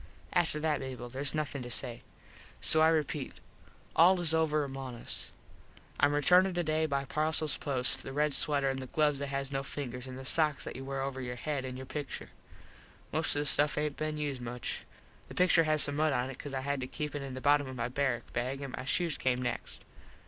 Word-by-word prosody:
After 170 -4 +2
that, 150 -2 +1
Mable, 130 -2 -6
theres 135 +3 -1
nothin 145 -3 -2
to 120 - -6
say. 120 0 0 0.6
So 155 - +3
I 160 - +7
repeat, 150 -3 0
its - - -17 0.6
all 180 +3 +6 0.2
over 155 -2 +2
among 135 -2 -5
us. 120 - -5 0.7
Im 145 +1 +5
returnin 180 +6 +5
today 160 -2 +1
by 140 -2 -1
parcels 155 +1 +2
post 130 -3 +1
the - - -7
red 150 +1 +1
sweter 145 -3 +2
an 135 0 0
the 130 -1 -5
gloves 150 0 +2
that 140 - -2
has 140 0 -2
no 135 -1 0
fingers 130 -2 -5
an 130 - -7
the 130 0 -8
sox 150 0 +3
that - - -6
you 130 - -6
wear 135 0 -3
over 135 -1 -3
your 125 -1 -4
head 140 +1 -2
an 130 -1 -5
your 130 - -7
pictur. 145 +1 -6 0.8
Most - - +1
of 145 - +1
the - - -2
stuff 145 +1 +3
aint 150 -1 0
been 155 0 -2
used 145 -4 -2
much. 120 0 -4 0.4
The - - -10
pictur 180 -2 +5
has 155 -1 +3
some 145 0 0
mud 155 -1 +3
on 125 +1 0
it 135 - -11
cause 140 -2 -6
I 130 - -1
had 140 0 -1
to 125 - -3
keep 150 +2 -4
it 145 - -3
in 135 -2 -6
the - - -4
bottom 145 +1 +3
of 130 - -6
my 120 -1 -1
barrak 130 -1 -1
bag 130 +3 -2
an 140 -2 -5
my 130 - -6
shoes 165 +4 0
came 125 -1 +1
next. 120 -1 -4
140 Hz, 225 wpm, -31 LUFS, 130-150 Hz, 0.8 s, I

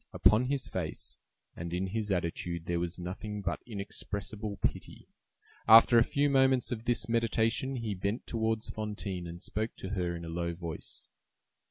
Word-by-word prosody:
Upon 110 +4 +5
his 135 0 -1
face 85 -4 -4 0.4
and 85 0 -5
in 90 +2 0
his 105 +2 -2
attitude 85 -1 -2
there 85 -1 0
was 85 0 -2
nothing 100 +4 -5
but - - -2
inexpressible 105 0 -4
pity. - - -3 0.6
After 115 +1 +9
a - - +6
few 145 +4 +1
moments 135 -2 +3
of 115 -1 -3
this 120 0 +1
meditation 115 +3 +1
he 115 -4 -2
bent 100 +5 -2
towards 110 -1 -1
Fantine, 100 -4 -4
and 85 +1 -7
spoke 110 +4 -3
to 95 - -6
her 90 -3 -1
in 85 0 -6
a - - -7
low 85 +1 -2
voice. 85 -2 -7
105 Hz, 165 wpm, -31 LUFS, 90-115 Hz, 0.6 s, After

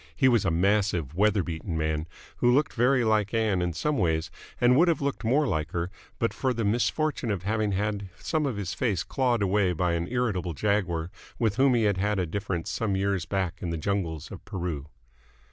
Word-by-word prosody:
He 130 - +4
was 120 -5 +3
a - - +3
massive, 90 -4 +1
weather 105 +2 +2
beaten 85 0 -4
man, 80 0 -1 0.3
who 120 - +3
looked 145 +5 +2
very 125 +1 +3
like 110 -1 +1
Ann 110 -5 +2
in 90 0 0
some 145 - -1
ways 80 -3 0 0.3
and 125 +1 +5
would 170 +6 +5
have 170 - +2
looked 140 -2 -2
more 135 +7 +3
like 80 - -2
her 85 +1 -2 0.3
but 115 - 0
for 130 -2 -1
the 115 - -1
misfortune 120 +5 0
of 100 -4 -2
having 105 0 0
had 100 0 -2
some 155 -3 -1
of 120 -6 -3
his 95 -4 -3
face 100 -11 0
clawed 125 -2 0
away 95 -1 +2
by 90 +1 0
an 85 +1 -1
irritable 105 -8 -1
jaguar 90 -4 0 0.3
with 110 -3 0
whom 135 -1 +4
he 115 - +2
had 100 -3 +2
had 105 +2 0
a 90 - +1
difference 90 -1 -3
some 105 -4 -1
years 95 -3 0
back 95 -1 -2
in 90 - -3
the 85 - -2
jungles 85 -4 -2
of - - -9
Peru. 85 -8 -4
100 Hz, 210 wpm, -27 LUFS, 85-115 Hz, 0.3 s, and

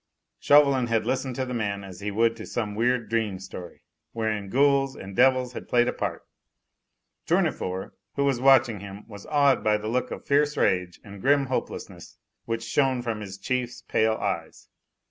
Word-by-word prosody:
Chauvelin 140 -4 +5
had 115 -1 0
listened 130 -1 -1
to 130 - -2
the 125 - -5
man 100 -4 -2
as 95 -2 -10
he 105 - -3
would 115 +3 +2
to 110 - -9
some 110 -4 -3
weird 120 +1 +1
dream 110 -3 -1
story, 90 -2 -10 0.3
wherein 110 -3 -2
ghouls 135 +2 +3
and 95 0 -9
devils 130 0 +3
had - - -8
played 120 0 +3
a - - 0
part. - - -4 1.0
Tournefort, 95 +1 0 0.2
who 140 - +1
was 135 -3 +1
watching 130 -5 +5
him, 100 +1 -10
was 100 -2 -11
awed 140 -3 +3
by 105 0 +3
the 105 +1 -6
look 125 +3 -1
of - - -7
fierce 145 +1 +2
rage 90 -2 +1
and 100 -2 -11
grim 140 +2 +3
hopelessness 130 -1 -5 0.3
which 115 0 -3
shone 130 +1 +1
from 115 -3 -3
his 100 -2 -7
chief's 120 +2 -3
pale 110 0 +1
eyes. - - -4
115 Hz, 180 wpm, -26 LUFS, 105-130 Hz, 1.0 s, Chauvelin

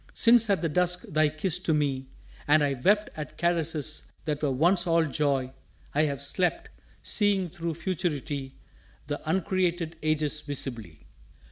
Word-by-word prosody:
Since 230 -1 +6
at 195 -3 +2
the - - +2
dusk 180 +3 0
thy 155 0 +2
kiss 160 +3 0
to 165 -4 +1
me, 135 -3 -1 0.4
and 150 +1 +5
I 140 -1 +1
Wept 205 +11 +2
at 150 -1 -7
caresses 160 -3 -1 0.2
that 150 -2 -2
were 150 - +1
once 175 +7 +3
all 165 -1 +3
joy, 140 -3 0 0.4
I 150 +2 +3
have 140 -2 -3
slept, 180 +5 -1 0.3
seeing 200 -4 +1
through 170 -3 -4
Futurity 150 -6 -3 0.5
The 145 0 -4
uncreated 180 -2 0
ages 155 -1 0
visibly! 120 - -5
155 Hz, 145 wpm, -27 LUFS, 145-180 Hz, 0.5 s, Since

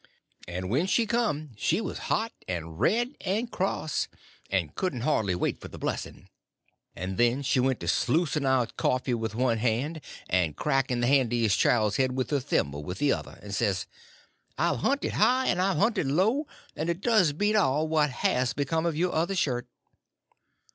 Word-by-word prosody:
And 90 +1 -4
when 150 +10 +2
she 230 +4 +2
come 210 - -1
she 170 - +1
was - - -4
hot 225 +1 +1 0.2
and 85 -3 -5
red 240 +6 +1
and 220 +5 -1
cross, 180 -5 -1 0.4
and 90 -6 -1
couldn't 150 -11 -2
hardly 110 -9 +1
wait 90 - -2
for - - -7
the - - -11
blessing; - - -4 0.7
and 95 +2 -4
then 120 +4 +3
she 130 - +2
went 130 0 +1
to - - -5
sluicing 150 +2 +1
out 130 -3 +1
coffee 130 0 0
with 110 -2 -2
one 120 -2 +1
hand 125 +8 -1 0.3
and 90 -5 +1
cracking 130 - 0
the - - +2
handiest 120 -6 +3
child's 110 -4 +3
head 130 -1 +1
with 130 -2 -2
her 145 - +2
thimble 75 - -1
with 90 +5 -5
the 145 +4 +2
other, - - -6
and 100 -1 -7
says: 100 -4 0 0.7
"I've - - +1
hunted 275 - 0
high 260 +1 +3
and 180 -5 +1
I've 190 0 +1
hunted 205 - +2
low, 215 - +2 0.3
and 160 +2 -2
it 170 +2 -2
does 215 -9 +4
beat 205 +8 +1
all 155 -6 +2
what 155 -2 +2
has 125 0 0
become 160 +4 0
of 160 -3 -1
your 180 +2 +1
other 170 +5 0
shirt." 125 -8 0
135 Hz, 180 wpm, -27 LUFS, 115-180 Hz, 0.7 s, does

